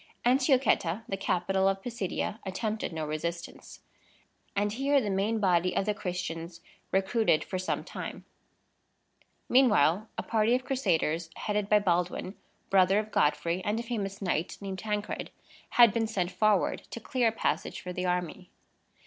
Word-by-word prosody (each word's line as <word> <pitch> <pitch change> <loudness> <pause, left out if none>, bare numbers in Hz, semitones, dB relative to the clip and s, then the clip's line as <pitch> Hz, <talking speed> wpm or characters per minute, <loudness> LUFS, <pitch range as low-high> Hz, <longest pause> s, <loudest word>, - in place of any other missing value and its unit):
Antiochetta, 250 - +3
the 195 - -2
capital 190 0 +1
of 195 0 0
Pisidia, 225 -2 -3
attempted 210 +3 -3
no 160 -1 -3
resistance; 170 +3 -5 0.7
and 205 +1 0
here 275 +4 +2
the 210 -6 -2
main 205 +4 0
body 180 -2 +2
of 195 - +1
the 210 - +1
Christians 175 -3 -5 0.3
recruited 195 -2 +2
for 185 - -4
some 185 - -2
time. - - -7 1.2
Meanwhile, 215 - +4
a - - -2
party 225 +1 +2
of 255 0 -2
Crusaders, 175 - 0
headed 210 -1 -2
by 210 - +6
Baldwin, 180 -1 0 0.4
brother 190 0 +5
of 215 0 -2
Godfrey, 170 +4 +1
and 215 +2 0
a - - -3
famous 200 -4 -4
knight 175 -2 -1
named 195 -1 -5
Tancred, 210 +1 -3 0.5
had 235 -4 +8
been 225 -1 0
sent 185 -5 -1
forward 215 -2 +2
to - - -6
clear 255 -2 0
a - - +3
passage 180 -5 -2
for 180 - -6
the 180 0 -2
army. 180 +1 -2
195 Hz, 150 wpm, -29 LUFS, 180-220 Hz, 1.2 s, had